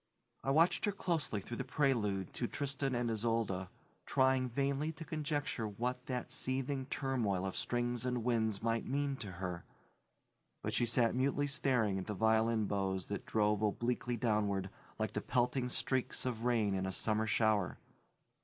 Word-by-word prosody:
I - - -1
watched 165 +9 +4
her 205 - +2
closely 160 - -1
through 120 +4 -6
the 135 - -1
prelude 120 - +1
to 120 - -1
Tristan 135 -1 -2
and 120 -1 0
Isolde, 110 -4 0 0.4
trying 130 -1 +3
vainly 140 +4 0
to 160 +1 -8
conjecture 150 -7 -2
what 125 +5 -3
that 125 -2 -3
seething 130 +1 -1
turmoil 115 -10 0
of 95 - -3
strings 120 0 -1
and 125 -2 -1
winds 110 -4 +1
might 115 0 0
mean 140 +1 0
to 100 -6 -6
her, 90 -1 -4 1.0
but - - -2
she 120 - +2
sat 115 0 +3
mutely 140 +3 +1
staring 125 -8 +1
at 95 - -6
the 105 - -2
violin 110 +1 +3
bows 95 -2 -1
that 100 - -4
drove 105 -1 +2
obliquely 120 +3 0
downward, 105 -4 +1 0.3
like 110 -1 -1
the 105 - -1
pelting 125 +1 +1
streaks 130 +1 -1
of 120 -2 -2
rain 115 -5 +2
in 95 0 0
a - - -1
summer 110 +3 +1
shower. 105 -3 +2
120 Hz, 165 wpm, -35 LUFS, 105-130 Hz, 1.0 s, watched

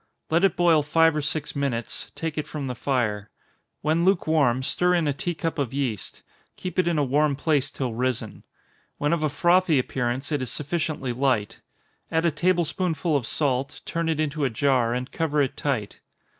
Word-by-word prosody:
Let 165 +3 +3
it 195 - +4
boil 170 -3 +4
five 165 +2 +3
or 150 - 0
six 150 +1 -3
minutes 130 -5 -3
take 165 -2 -3
it 150 - -3
from 150 -3 -5
the 125 - -3
fire. 110 -5 -1 0.5
When 160 +3 +1
lukewarm, 155 -9 +2
stir 180 +6 +2
in 170 -3 +1
a 145 - +1
tea 175 +5 -3
cup 160 0 -3
of 135 -2 -2
yeast 120 -9 -3 0.3
keep 185 0 -4
it 180 - +3
in 170 -2 +1
a 145 - +3
warm 145 +2 +2
place 145 -1 +1
till 130 -4 -3
risen. 120 -2 -2 0.5
When 145 +2 +1
of 170 - 0
a 155 - +1
frothy 175 +2 +3
appearance, 130 +2 -1
it 145 -3 0
is 130 - -2
sufficiently 150 -4 -2
light. 125 -5 0 0.5
Add 165 0 +1
a 170 - +3
table 175 +2 +2
spoonful 165 -2 -1
of 130 -5 0
salt, 140 -1 0
turn 165 -1 -1
it 160 -2 0
into 155 -1 -1
a 135 - +2
jar, 125 0 +2
and 125 +1 -4
cover 155 -3 0
it 135 -3 +1
tight. 125 -8 -2
145 Hz, 195 wpm, -25 LUFS, 130-165 Hz, 0.5 s, it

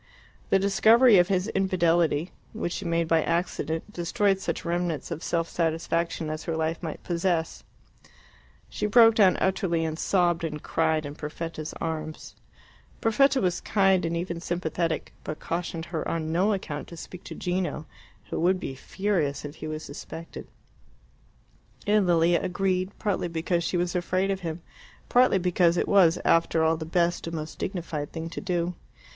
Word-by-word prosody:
The - - +5
discovery 215 +3 +6
of 175 - +4
his 190 0 0
infidelity 175 -4 +1 0.2
which 175 - -3
she 200 - -5
made 170 -1 0
by 165 0 +3
accident 170 +2 -2
destroyed 195 +3 +1
such 170 -2 -3
remnants 170 -3 -2
of 165 -1 -4
self 165 -2 -1
satisfaction 165 -1 -1
as 155 0 -5
her 165 -1 -2
life 160 +1 -1
might 160 -3 -3
yet - - -29
possess. 170 -2 -1 1.0
She - - -2
broke 225 +1 +7
down 200 -4 +5
utterly 180 -3 +1
and 160 0 -3
sobbed 175 -3 +2
and 150 -2 -4
cried 160 -1 +1
in 145 - -6
Perfetta's 155 +1 -6
arms. 155 -1 -5 0.7
Perfetta 270 +5 +3
was 180 -5 0
kind 195 -2 +3
and 170 0 -1
even 170 0 -3
sympathetic, 170 -1 -2
but 155 - -5
cautioned 170 -1 -3
her 160 - -2
on 160 -1 -2
no 185 +6 +2
account 160 -7 -4
to 170 - -10
speak 180 +3 -9
to - - -7
Gino, 175 -4 -2 0.5
who - - -2
would 185 +2 +2
be 135 - -5
furious 155 -2 -2
if 145 +2 -8
he - - -6
was 155 0 -5
suspected. 165 +3 -9 1.4
And 205 -2 +3
Lilia 170 0 +4
agreed, 185 0 0
partly 200 -4 -1
because 170 +1 -1
she 175 - -1
was 175 +1 -1
afraid 185 +2 0
of 195 - -2
him, 165 -2 -5 0.5
partly 250 -5 +5
because 175 -1 +2
it - - +1
was, 180 -5 +5
after 165 -1 +3
all, 160 0 +3
the 160 0 -6
best 170 +1 0
and 165 - -4
most 155 0 -6
dignified 165 -6 -4
thing 165 0 -5
to - - -5
do. 175 0 -1
170 Hz, 165 wpm, -26 LUFS, 160-185 Hz, 1.4 s, broke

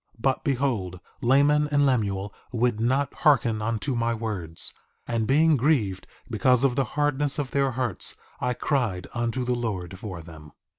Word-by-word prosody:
2:18 115 - -20
But, 135 +1 +1
behold, 120 -10 -1 0.2
Laman 145 +4 +4
and 145 -1 +3
Lemuel 100 -6 0 0.2
would 120 -2 +1
not 130 +5 +1
hearken 120 -8 +3
unto 115 +5 -1
my 115 -1 0
words; 100 -8 -3 0.3
and 115 -2 -1
being 155 +3 +4
grieved 120 -9 +1 0.2
because 125 +2 +3
of 130 -3 +3
the 135 - +2
hardness 145 -1 +1
of 145 -3 -3
their 140 -1 +2
hearts 125 -6 -1 0.2
I 125 0 -1
cried 115 - -1
unto 120 +2 -1
the 125 - +1
Lord 95 -7 -3
for 95 -6 -7
them. 80 -2 -13
120 Hz, 160 wpm, -26 LUFS, 105-135 Hz, 0.3 s, Laman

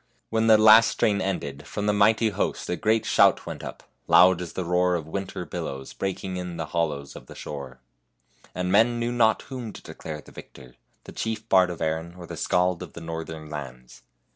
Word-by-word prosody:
When 110 0 +1
the 110 -1 +7
last 110 +1 +8
strain 100 -2 +1
ended, 75 -7 -4
from 105 +6 -4
the 105 - +2
mighty 110 +2 +3
host 100 - -2
a - - +1
great 110 +3 +1
shout - - +4
went - - -7
up, - - -8 0.2
loud 90 -1 +6
as 90 - -6
the 95 - -3
roar 90 +1 +2
of 80 -3 -3
winter 95 +1 -5
billows 65 -3 -6
breaking 95 -1 -4
in 90 -1 -5
the 80 - -3
hollows 75 -5 -2
of - - -11
the - - -12
shore; 65 -3 -8 0.7
and 90 0 -2
men 115 +4 +4
knew 120 0 -1
not 115 -2 +2
whom 125 -5 -7
to - - -11
declare 75 -1 -8
the - - -15
victor, 65 -3 -13 0.3
the - - -11
chief 110 0 -4
bard 95 -3 +4
of 85 -2 -4
Erin 80 +2 -3
or 90 - -9
the - - -8
Skald 90 -1 +1
of - - -9
the 85 - -9
northern 80 -1 -6
lands. 65 -5 -9
90 Hz, 205 wpm, -25 LUFS, 80-105 Hz, 0.7 s, last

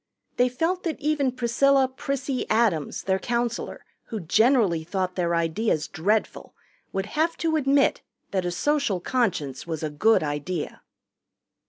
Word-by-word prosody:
They 250 0 +4
felt 330 +9 -1
that 330 -4 -3
even 295 -3 +1
Priscilla 260 +2 +3
("Prissy") 270 0 -3
Adams, 215 -10 +1
their 190 0 +1
counselor, 235 +1 -2 0.2
who 220 - -5
generally 205 - +3
thought 185 +2 -2
their 170 -2 0
ideas 170 +1 0
dreadful, 210 +7 -1 0.4
would 195 0 -2
have 315 +9 0
to 325 -2 0
admit 280 -2 +3 0.3
that 190 -2 0
a 175 - -1
Social 275 +1 0
Conscience 175 - -1
was 160 -2 -4
a 155 - -2
good 215 +7 +3
idea. 150 +3 -4
225 Hz, 140 wpm, -25 LUFS, 175-270 Hz, 0.4 s, They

